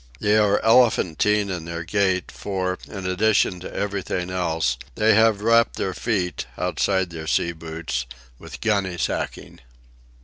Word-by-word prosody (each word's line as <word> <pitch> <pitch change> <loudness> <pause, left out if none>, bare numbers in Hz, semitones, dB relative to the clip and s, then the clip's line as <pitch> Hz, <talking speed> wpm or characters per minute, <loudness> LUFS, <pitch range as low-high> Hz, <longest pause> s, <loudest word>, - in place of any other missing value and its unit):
They 105 0 +2
are 105 -1 +3
elephantine 105 -4 +3
in 85 -3 -4
their 85 0 -5
gait 95 0 0
for, 95 -2 -3
in 95 -3 -7
addition 95 0 +2
to 90 - -8
everything 95 -3 -3
else, 80 -7 0 0.2
they 110 +1 +4
have 110 -1 +4
wrapped 115 +1 +3
their 95 - -2
feet, 95 -4 -2
outside 90 0 0
their 80 -1 -7
sea 85 - +1
boots, 80 -6 -5 0.3
with - - -10
gunny 100 -5 0
sacking. - - -3
95 Hz, 140 wpm, -23 LUFS, 85-105 Hz, 0.3 s, they